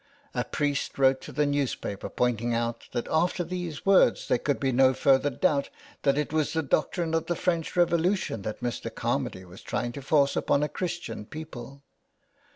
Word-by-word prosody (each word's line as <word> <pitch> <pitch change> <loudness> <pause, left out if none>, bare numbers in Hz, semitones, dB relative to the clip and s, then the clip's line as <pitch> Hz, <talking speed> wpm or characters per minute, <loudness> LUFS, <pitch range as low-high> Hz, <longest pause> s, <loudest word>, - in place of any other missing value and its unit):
A - - 0
priest 145 -1 -2
wrote 135 -1 +4
to - - -9
the 150 0 +1
newspapers 140 -8 -2
pointing 120 -1 +1
out 115 0 -2
that 120 - -3
after 175 +3 +2
these 175 -3 -5
words 195 -1 +4
there 120 - +3
could 145 +1 0
be 135 -1 +1
no 130 +1 +4
further 135 +1 +4
doubt 145 0 +1 0.3
that 140 -1 +2
it 150 0 -1
was 155 -2 +1
the 160 0 0
doctrine 160 +3 0
of 165 0 0
the 175 - 0
French 170 -3 -1
Revolution 175 - +1
that 105 +2 -5
Mr. 120 -1 -3
Carmady 95 0 -2
was 90 +1 -13
trying 120 - -2
to 140 - -7
force 140 0 +3
upon 140 - +2
a 150 - 0
Christian 175 - -4
people. 140 -3 -9
145 Hz, 180 wpm, -27 LUFS, 125-165 Hz, 0.3 s, wrote